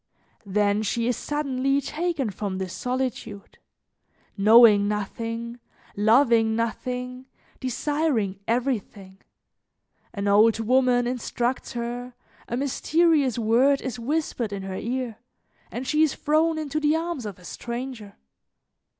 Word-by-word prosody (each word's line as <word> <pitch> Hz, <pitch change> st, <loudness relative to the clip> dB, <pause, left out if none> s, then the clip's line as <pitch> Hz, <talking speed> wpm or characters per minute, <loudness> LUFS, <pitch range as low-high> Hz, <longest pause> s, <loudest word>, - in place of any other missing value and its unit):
Then 205 Hz, +1 st, +1 dB
she 230 Hz, +2 st, -1 dB
is 245 Hz, -, +1 dB
suddenly 275 Hz, -1 st, -1 dB
taken 305 Hz, -4 st, -2 dB
from 195 Hz, -1 st, -4 dB
this 185 Hz, -2 st, -4 dB
solitude, 250 Hz, -5 st, -4 dB, 0.8 s
knowing 210 Hz, 0 st, +7 dB
nothing, 230 Hz, +3 st, -4 dB, 0.4 s
loving 225 Hz, +1 st, +4 dB
nothing, 250 Hz, +3 st, -3 dB, 0.3 s
desiring 255 Hz, -6 st, -1 dB
everything; 220 Hz, -6 st, -2 dB, 0.9 s
an 200 Hz, -1 st, -3 dB
old 215 Hz, +3 st, +5 dB
woman 245 Hz, +1 st, +3 dB
instructs 245 Hz, +1 st, -2 dB
her, 240 Hz, +1 st, -5 dB, 0.3 s
a 240 Hz, -, -3 dB
mysterious 285 Hz, 0 st, +2 dB
word 240 Hz, +5 st, +3 dB
is 250 Hz, -2 st, -5 dB
whispered 250 Hz, -4 st, -2 dB
in 200 Hz, -1 st, -5 dB
her 190 Hz, 0 st, -5 dB
ear, 240 Hz, +1 st, -3 dB, 0.5 s
and 250 Hz, -, -5 dB
she 305 Hz, +4 st, +1 dB
is 315 Hz, -3 st, +3 dB
thrown 315 Hz, +2 st, +1 dB
into 310 Hz, -1 st, -2 dB
the 300 Hz, +1 st, +2 dB
arms 325 Hz, -8 st, -3 dB
of 200 Hz, -, -8 dB
a 180 Hz, -, -16 dB
stranger. 235 Hz, -3 st, -6 dB
240 Hz, 115 wpm, -25 LUFS, 215-270 Hz, 0.9 s, knowing